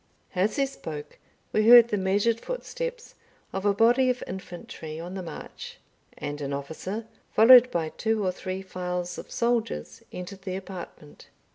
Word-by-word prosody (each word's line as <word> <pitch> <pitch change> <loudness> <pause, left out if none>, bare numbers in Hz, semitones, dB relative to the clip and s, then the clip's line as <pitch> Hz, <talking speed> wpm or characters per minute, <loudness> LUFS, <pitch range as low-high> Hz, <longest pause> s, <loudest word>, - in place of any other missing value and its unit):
As 190 +4 +1
he 275 - +2
spoke 150 - -8 0.3
we 215 0 +3
heard 240 -1 +10
the 210 - +1
measured 205 +4 +1
footsteps - - -5 0.4
of 195 +2 -1
a 200 - +4
body 240 +4 +4
of 250 0 -1
infantry 170 -4 -8
on 175 +2 -7
the 190 - -4
march; 165 -4 -9 0.4
and 145 0 -5
an 140 0 -3
officer, 160 +10 -5 0.3
followed 245 +3 +9
by 165 -6 -1
two 220 +3 -1
or 185 - +2
three 185 +1 -5
files 180 -1 -4
of - - -10
soldiers, 235 -1 -1
entered 185 +2 -7
the 185 -1 -4
apartment. 185 -6 -9
190 Hz, 155 wpm, -27 LUFS, 175-230 Hz, 0.4 s, heard